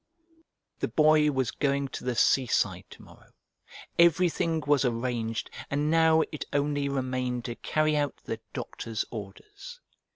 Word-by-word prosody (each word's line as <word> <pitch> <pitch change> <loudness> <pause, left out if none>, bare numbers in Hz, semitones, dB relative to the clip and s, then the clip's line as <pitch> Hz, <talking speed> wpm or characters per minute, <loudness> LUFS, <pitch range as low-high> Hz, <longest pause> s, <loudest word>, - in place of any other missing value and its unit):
The - - 0
Boy 155 -1 +4
was 130 -4 0
going 140 -1 0
to - - -7
the 125 -1 -1
seaside 125 +1 +2
to - - -14
morrow. - - -18 0.7
Everything 170 -1 +3
was 145 -1 +3
arranged, 115 -2 -2 0.2
and 145 +2 0
now 160 -1 +5
it 150 - -4
only 145 0 0
remained 130 -2 -2
to 120 - -3
carry 155 +3 0
out 145 -1 0
the - - -4
doctor's 110 -2 -4
orders. 400 - -9
140 Hz, 135 wpm, -28 LUFS, 125-155 Hz, 0.7 s, now